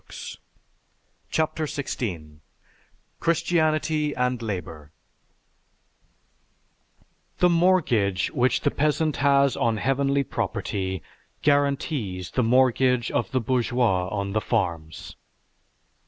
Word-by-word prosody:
"_) - - -8 0.9
CHAPTER 160 0 0
XVI 85 - -5 0.8
CHRISTIANITY 155 -2 +1
AND 125 -1 0
LABOR 90 -8 -6 2.5
_The 180 -1 +4
mortgage 145 - +2
which 125 +1 +1
the - - +1
peasant 150 +1 0
has 140 -1 +3
on 115 -1 0
heavenly 140 +4 +1
property 95 -7 -3 0.4
guarantees 140 - 0
the 130 - +1
mortgage 125 0 +3
of - - -1
the 130 - 0
bourgeois 120 -6 +1
on 100 0 -3
the 110 - +1
farms. 85 -10 -3
125 Hz, 90 wpm, -25 LUFS, 100-145 Hz, 2.5 s, The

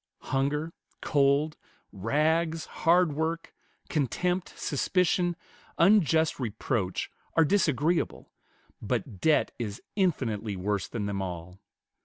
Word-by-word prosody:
Hunger, 150 +4 0 0.3
cold, 145 +1 +2 0.3
rags, 160 - +1
hard 170 -1 +3
work, 160 +2 -2 0.3
contempt, 175 - -1
suspicion, 175 +5 +1 0.4
unjust 165 -5 +4
reproach, 110 -4 -2 0.2
are 165 - +5
disagreeable, 165 -2 +1 0.5
but 95 - -3
debt 155 -1 +3
is 105 -3 -4 0.2
infinitely 115 - 0
worse 100 +1 -1
than 110 -4 -4
them 100 -1 -2
all. 90 0 -6
150 Hz, 95 wpm, -28 LUFS, 110-165 Hz, 0.5 s, are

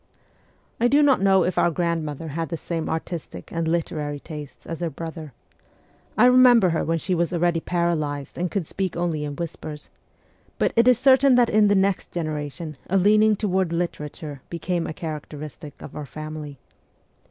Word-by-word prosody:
I 240 - +4
do 285 +4 +4
not 275 -8 +4
know 195 -2 +5
if 180 - 0
our - - +4
grandmother 165 -2 -2
had 165 +1 -3
the 165 - -3
same 165 0 -4
artistic 160 - -5
and 165 -1 -2
literary 155 -3 -2
tastes 150 -2 -9
as 165 - -5
her 170 -1 -1
brother 160 0 -7 0.9
I 230 - +6
remember 250 -5 +7
her 165 - 0
when 165 +1 0
she 185 +3 -2
was 170 -1 0
already 175 -1 +1
paralyzed 155 -5 -1
and 180 +1 -2
could 195 -2 -2
speak 185 0 -3
only 170 -3 -1
in 145 -1 -5
whispers; 155 -2 -7 0.7
but - - +1
it 230 +1 +4
is 250 -2 +6
certain 265 +1 +5
that 245 -1 +4
in 215 0 +5
the 205 - +4
next 195 0 +1
genera 155 -3 -2
tion 150 +1 -8
a 195 - +3
leaning 215 +3 +5
toward 190 -4 0
literature 150 -4 -4
became 170 0 -2
a - - -4
characteristic 150 -1 -7
of - - -10
our 150 -2 -6
family 155 -1 -7
170 Hz, 175 wpm, -24 LUFS, 155-190 Hz, 0.9 s, remember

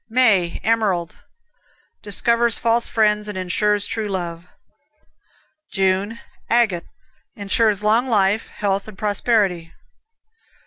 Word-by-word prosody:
May, 220 -8 +2
Emerald 205 -7 0 0.8
Discovers 235 +3 +2
false 230 +1 +1
friends, 210 -1 +1
and 205 -2 -6
insures 205 +3 0
true 220 -2 -3
love. 175 -3 -5 1.2
June, 195 +3 0 0.3
Agate 220 -8 +1 0.5
Insures 205 +1 +1
long 225 +4 +2
life, 210 -2 +1
health 200 -1 -2
and 210 -3 -11
prosperity. 205 -5 0
210 Hz, 95 wpm, -20 LUFS, 190-225 Hz, 1.2 s, May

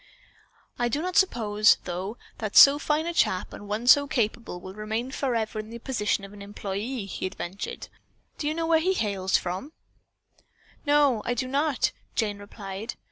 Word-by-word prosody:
"I 240 0 +1
do 285 - -1
not 365 +2 -3
suppose, 215 - +4
though, 185 +5 -4 0.2
that 215 -2 -4
so 285 +1 +9
fine 300 +2 0
a 340 - -2
chap 185 - +1
and 205 - -9
one 210 +3 -3
so 285 +3 +7
capable 230 -8 -2
will 185 +1 -9
remain 220 +4 -3
forever 230 -6 -1
in 215 0 -6
the 230 - -7
position 210 -5 -1
of 195 - -13
an 205 - -11
employee," 205 +3 -4
he 190 -1 -4
ventured. 190 +1 -6 0.5
"Do 295 - -2
you 305 - 0
know 330 0 -1
where 325 -1 +4
he 370 +4 +1
hails 195 - +1
from?" 185 - -5 1.1
"No, 290 -6 +4
I 245 - -1
do 255 +2 -2
not," 280 0 +1 0.2
Jane 205 -2 -1
replied. 205 +1 -7
225 Hz, 175 wpm, -26 LUFS, 205-280 Hz, 1.1 s, so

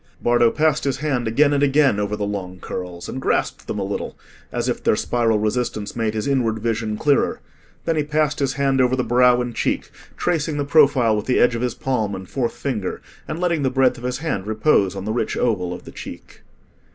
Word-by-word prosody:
Bardo 120 -1 +4
passed 155 +2 +1
his 140 -2 0
hand 135 -5 -1
again 145 +6 +3
and 140 - +1
again 140 -5 +3
over 105 0 -1
the 105 - -2
long 95 -3 -4
curls 90 -2 -6
and 130 - -5
grasped - - -1
them - - -3
a - - -1
little, - - -4 0.3
as - - -2
if - - -1
their - - +3
spiral 115 -2 +1
resistance 110 -1 -2
made 110 -2 -1
his 110 - -2
inward 125 -5 +1
vision 110 -1 -2
clearer; 145 +2 +2 0.5
then 165 - +1
he 155 - +1
passed 150 0 0
his 135 -2 0
hand 135 -1 +2
over 125 0 +3
the 125 - 0
brow 125 +1 +4
and 120 -1 -4
cheek, - - -1 0.3
tracing 160 -3 0
the 145 - -1
profile 140 -7 +4
with 105 0 -3
the 130 - +2
edge 120 - +4
of 115 - -3
his 125 -2 -1
palm 110 -7 -1
and 95 0 -8
fourth 120 -4 -1
finger, 110 -9 -3 0.3
and 155 - -4
letting 170 -3 +1
the 135 - +2
breadth 130 -1 +2
of - - -13
his 125 0 -2
hand 130 - -3
repose 110 -3 +2
on 95 0 -5
the 110 - -1
rich 120 - -1
oval 90 -7 0
of 90 - -7
the - - -9
cheek. - - -10
125 Hz, 225 wpm, -21 LUFS, 110-140 Hz, 0.5 s, Bardo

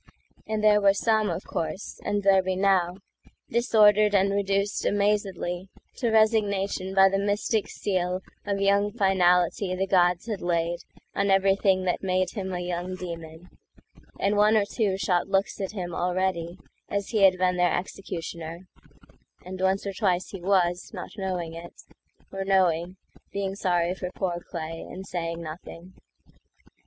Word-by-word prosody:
And 215 -1 -2
there 210 -1 +5
were 200 -1 +5
some, 220 0 +2
of 165 - -3
course, 160 +5 -4
and 205 0 -1
there 195 -1 +5
be 185 0 -2
now, 185 -2 +2 0.5
Disordered 215 -3 +4
and 195 0 +3
reduced 200 0 0
amazedlyTo 200 +2 -1
resignation 200 -3 +1
by 195 0 +7
the 195 0 0
mystic 205 +2 0
sealOf 185 -2 -2 0.4
young 200 +1 +2
finality 185 -2 +2
the 190 +1 0
gods 180 -2 +2
had 215 -4 -3
laidOn 170 0 -1 0.5
everything 195 0 +3
that 180 -1 -1
made 185 -1 0
him 190 -3 -4
a 180 - -3
young 180 +1 -3
demon; 170 -1 -8 0.7
And 200 +1 +1
one 210 +1 +5
or 205 - +2
two 200 -2 -1
shot 180 -1 0
looks 195 +1 0
at 195 +1 -3
him 180 -4 -4
alreadyAs 180 +2 -3
he 215 -3 0
had 190 -1 +6
been 180 0 +1
their 180 -1 +2
executioner; 170 -2 -6 0.8
And 185 0 -7
once 190 +1 +1
or 200 - -3
twice 185 -3 0
he 195 - -8
was, 180 -1 +1
not - - -7
knowing 185 -5 -3
it,—Or 175 +3 -10
knowing, 185 -2 +1 0.3
being 195 -1 -2
sorry 180 -3 0
for 185 -1 -5
poor 175 -2 -3
clayAnd 165 +3 -6
saying 170 -2 -4
nothing. 165 +3 -9
190 Hz, 140 wpm, -26 LUFS, 175-200 Hz, 0.8 s, by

